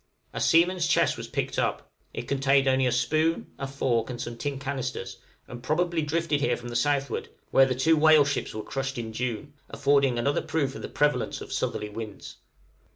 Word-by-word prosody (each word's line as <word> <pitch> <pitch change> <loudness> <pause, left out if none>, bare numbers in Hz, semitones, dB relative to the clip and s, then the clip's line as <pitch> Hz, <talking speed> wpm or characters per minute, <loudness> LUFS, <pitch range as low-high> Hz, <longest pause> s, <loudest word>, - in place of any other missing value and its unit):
A - - -4
seaman's 170 +1 +3
chest - - +3
was - - -7
picked - - -2
up; - - -2 0.2
it - - -5
contained 135 0 +2
only 130 -1 +3
a - - +1
spoon, 155 +6 0
a 135 - -3
fork, 130 -4 0
and 120 -1 -5
some 120 -1 -5
tin 140 +3 -3
canisters, 130 -8 -4 0.3
and 120 0 -9
probably 170 +5 0
drifted 155 -1 0
here 150 - +1
from 120 0 -8
the 120 - -6
southward, 140 +3 0 0.2
where 135 0 +6
the 130 - -1
two 160 +6 +3
whale 155 -1 +6
ships 145 -5 -2
were 110 - -4
crushed 135 -1 -4
in 115 -2 -5
June, 125 +4 -4 0.2
affording 140 -3 +2
another 140 +4 +1
proof 140 -4 -1
of - - -8
the - - -5
prevalence 150 0 0
of - - -7
southerly 105 - -2
winds. 105 -1 -8
135 Hz, 195 wpm, -27 LUFS, 120-150 Hz, 0.3 s, where